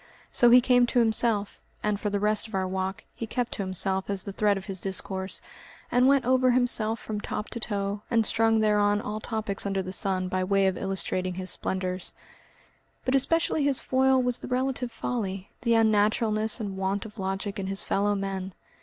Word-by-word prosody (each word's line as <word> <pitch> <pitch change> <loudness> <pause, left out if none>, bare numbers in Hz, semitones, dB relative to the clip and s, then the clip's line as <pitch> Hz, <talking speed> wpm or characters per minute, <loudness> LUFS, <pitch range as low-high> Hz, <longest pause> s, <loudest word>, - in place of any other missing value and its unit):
So 240 - +5
he 250 +1 +8
came 245 -1 +4
to 245 - -1
himself, 225 -3 +2 0.2
and 210 -1 0
for 210 - -2
the 200 0 -1
rest 210 +1 +1
of 215 - -7
our 190 -1 0
walk 190 +1 -3
he 230 - -6
kept 245 +2 -2
to - - -3
himself 190 0 0
as 195 -2 +4
the 200 - -6
thread 205 0 +1
of 190 - -7
his 195 -3 -4
discourse, 190 0 -4 0.5
and 250 +1 +4
went 275 -2 +3
over 255 0 +3
himself 235 -3 +2
from 210 -1 -5
top 210 - -4
to 235 - -6
toe, 200 -2 -2
and 230 -2 +2
strung 225 0 +2
thereon 205 -1 +3
all 215 -1 -4
topics 215 -3 -3
under 195 -1 -1
the 185 +1 -6
sun 185 -1 -1
by 185 0 -1
way 195 +1 +2
of 190 -1 +1
illustrating 185 -1 -2
his 185 0 -2
splendours. 185 -1 -3 0.9
But 255 - 0
especially 315 +2 +3
his 280 -2 +2
foil 265 0 +2
was 250 -1 +1
the - - -8
relative 255 -1 -1
folly, 200 -5 -4
the 235 -2 +2
unnaturalness 215 0 +2
and 200 -3 -5
want 195 +1 -2
of 215 0 -11
logic 195 +1 -3
in 190 - -3
his 195 0 -1
fellow 205 +1 +1
men. 195 -1 -4
210 Hz, 200 wpm, -27 LUFS, 195-235 Hz, 0.9 s, he